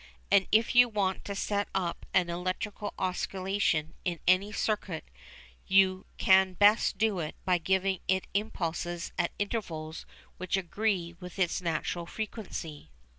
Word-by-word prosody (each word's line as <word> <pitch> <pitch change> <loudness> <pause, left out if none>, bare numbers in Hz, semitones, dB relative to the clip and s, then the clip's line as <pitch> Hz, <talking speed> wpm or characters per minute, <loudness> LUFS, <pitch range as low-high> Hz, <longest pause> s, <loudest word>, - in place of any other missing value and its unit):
And 195 -1 +5
if 220 +2 +4
you 245 0 +7
want 195 -3 -1
to 200 - -4
set 205 +1 -1
up 180 -3 -2
an 180 -2 +3
electrical 185 +4 -3
oscillation 185 -3 -1
in 175 -2 -2
any 185 +3 +4
circuit 205 -6 -2 0.6
you 190 -1 +4
can 190 0 +5
best 205 +2 +4
do 210 -3 +1
it 155 -2 -4
by 180 -1 +3
giving 190 +2 +1
it 190 0 +1
impulses 175 -4 -2
at 175 - +2
intervals 165 -7 -4 0.3
which 185 +1 -1
agree 190 -2 -1
with 180 0 -9
its 185 -1 +1
natural 170 0 -2
frequency. 180 - -6
190 Hz, 135 wpm, -30 LUFS, 175-205 Hz, 0.6 s, you